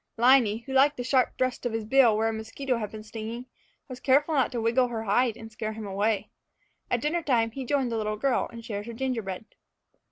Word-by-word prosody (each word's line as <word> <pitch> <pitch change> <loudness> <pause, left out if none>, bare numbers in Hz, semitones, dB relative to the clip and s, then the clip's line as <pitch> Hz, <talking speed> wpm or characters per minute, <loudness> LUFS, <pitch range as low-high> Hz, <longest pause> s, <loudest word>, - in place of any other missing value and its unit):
Liney, 235 -2 +4
who 265 - -7
liked 280 +2 +4
the 245 - -3
sharp 255 0 +1
thrust 255 -1 -1
of 245 -2 -2
his 225 -1 -2
bill 235 -2 +5
where 220 +1 +1
a 225 - -1
mosquito 230 +3 -3
had 210 -2 -4
been 215 -1 -9
stinging, 225 +3 -6 0.4
was 255 -2 -8
careful 285 +5 +3
not 270 -3 +2
to 245 - -2
wiggle 235 +3 +2
her 230 -2 -4
hide 225 +2 +1
and 225 -1 -10
scare 220 -1 -4
him 220 -1 -7
away. 200 +2 -1 0.6
At 240 - 0
dinner 315 +5 0
time 235 -7 +1
he 265 +3 -6
joined 265 -2 0
the 230 - -1
little 215 -1 -2
girl 270 +3 0
and 230 -1 -10
shared 205 -2 -5
her 235 - -6
gingerbread. 225 -6 -3
235 Hz, 225 wpm, -27 LUFS, 220-260 Hz, 0.6 s, bill